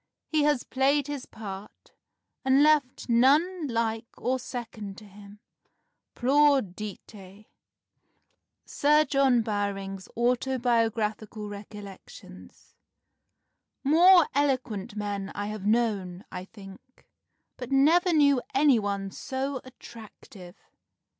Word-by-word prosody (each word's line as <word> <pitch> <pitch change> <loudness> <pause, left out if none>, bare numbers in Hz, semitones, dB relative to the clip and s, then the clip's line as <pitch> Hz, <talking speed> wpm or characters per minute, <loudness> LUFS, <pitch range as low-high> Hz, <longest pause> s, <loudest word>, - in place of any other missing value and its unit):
He 310 -1 +1
has 295 -4 +1
played 275 +2 +1
his 290 -2 -6
part, 200 -2 -10 0.5
and 265 +2 +4
left 295 -4 +2
none 295 +8 +3
like 230 -1 -2
or 260 +1 -1
second 225 -5 -7
to 215 - -12
him. 205 +1 -15 0.7
Plaudite!" 255 -7 +1
[Sidenote: 200 0 -14 1.2
Sir 300 +2 +3
John 270 -3 +3
Bowring's 195 -2 -4
Autobiographical 230 -4 0
Recollections.] 205 -1 -12 1.1
"More 340 +4 +6
eloquent 255 -7 -1
men 205 -2 -4
I 205 - -3
have 210 -2 -5
known, 210 -5 0
I 180 0 -6
think, 195 +5 -15 0.5
but 250 +1 -8
I - - +2
never 335 +6 +4
knew 285 -5 +4
any 275 -3 +4
one 200 -1 -3
so 265 +3 -4
attractive. 215 -7 -13
235 Hz, 100 wpm, -27 LUFS, 205-275 Hz, 1.2 s, More